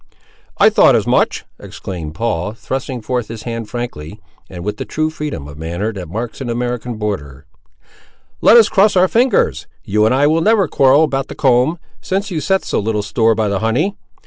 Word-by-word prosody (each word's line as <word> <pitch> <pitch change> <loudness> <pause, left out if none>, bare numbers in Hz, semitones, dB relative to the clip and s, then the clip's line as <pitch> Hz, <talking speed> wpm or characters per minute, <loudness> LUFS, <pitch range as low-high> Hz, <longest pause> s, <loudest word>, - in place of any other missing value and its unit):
"I - - +5
thought - - +5
as - - +1
much," - - +1
exclaimed 80 -5 -7
Paul, 105 -3 -2
thrusting 130 0 -5
forth 125 -2 -2
his 110 -1 -8
hand 115 -2 -5
frankly, 105 -8 -6 0.3
and 90 -2 -8
with 105 0 -3
the - - -4
true 155 0 -2
freedom 150 - -5
of 75 +1 -11
manner 85 +7 -3
that 90 -5 -7
marks 115 - -5
an 125 - -4
American 120 0 -3
borderer. 75 -11 -5 1.0
"Let 230 - +7
us 225 - +7
cross 200 +1 +3 0.2
fingers. 245 +3 +1 0.2
You 105 +2 +2
and 125 - +2
I 140 +2 +3
will 160 +2 +2
never 210 -1 +3
quarrel 140 +2 +4
about 135 -3 -1
the - - -9
comb, 130 +4 +2 0.2
since 195 +2 -2
you 160 -3 -2
set 190 +3 0
so - - -1
little 105 0 -1
store 115 +2 +2
by 110 -1 0
the 100 -1 -1
honey. 130 - 0
120 Hz, 190 wpm, -17 LUFS, 105-150 Hz, 1.0 s, Let